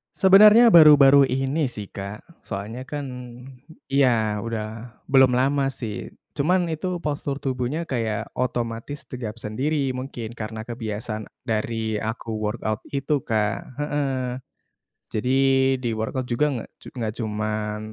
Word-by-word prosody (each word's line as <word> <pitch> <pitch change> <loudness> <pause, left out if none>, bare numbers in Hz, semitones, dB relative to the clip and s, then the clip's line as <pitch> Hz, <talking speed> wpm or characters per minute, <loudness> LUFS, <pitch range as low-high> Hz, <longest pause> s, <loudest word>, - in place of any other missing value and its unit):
Sebenarnya 210 +4 +7
baru-baru 140 -4 +8
ini 135 +3 0
sih, 105 -4 -7
Kak. 100 +2 -7 0.2
Soalnya 110 +6 -6
kan, 145 -1 -4 0.9
ya 115 -6 +2
udah 115 +1 -6 0.2
belum 130 -2 +6
lama 135 +2 +2
sih 120 -6 -6 0.2
cuman 175 +4 +2
itu 175 +2 -3
postur 145 -1 -3
tubuhnya 130 +4 -2
kaya 115 -5 -1 0.2
otomatis 120 +2 -3
tegap 115 -3 -6
sendiri 135 +6 -1
mungkin 125 -3 -5
karena 110 0 -5
kebiasaan 110 -2 -5 0.2
dari 110 -1 -2
aku 110 +1 -4
workout 110 0 -2 0.2
itu 140 0 -1
Kak. 105 -1 0 0.2
Heeh, 135 -4 -2 0.7
jadi 125 +5 0 0.5
di 120 - -1
workout 125 +3 -3
juga 135 +6 +2
nggak 115 - -6
cu - - -18
nggak 110 -3 -3
cuman 105 -1 -2
125 Hz, 125 wpm, -24 LUFS, 110-140 Hz, 0.9 s, baru-baru